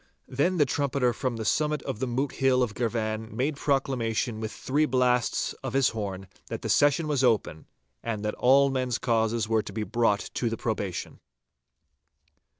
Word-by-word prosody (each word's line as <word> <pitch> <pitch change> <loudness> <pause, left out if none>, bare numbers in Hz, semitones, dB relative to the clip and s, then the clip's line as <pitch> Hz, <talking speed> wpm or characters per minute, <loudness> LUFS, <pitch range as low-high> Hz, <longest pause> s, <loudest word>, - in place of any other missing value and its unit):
Then 170 +8 0
the 150 - +4
trumpeter 135 -2 0
from 125 +1 -2
the 110 - -4
summit 150 +3 +1
of 130 -6 -4
the 130 - -1
Moot 130 +4 -1
Hill 130 -1 +2
of 115 -4 -2
Girvan 110 -1 -2
made 140 +4 0
proclamation 125 -5 -1
with 110 -1 -4
three 150 +3 0
blasts 125 -2 +1
of 135 -2 -5
his 135 -2 +3
horn 100 -4 -5 0.2
that - - -6
the - - -3
session 145 +2 +3
was 145 -3 +1
open, 105 -10 +1 0.3
and 110 -2 -3
that 105 - -1
all 135 +2 +4
men's 130 -2 -1
causes 115 -2 0
were 110 -1 +2
to 100 - -9
be 110 +2 -3
brought 115 -2 0
to 120 - -1
the 115 - -3
probation. 105 -6 -4
125 Hz, 175 wpm, -27 LUFS, 110-135 Hz, 0.3 s, the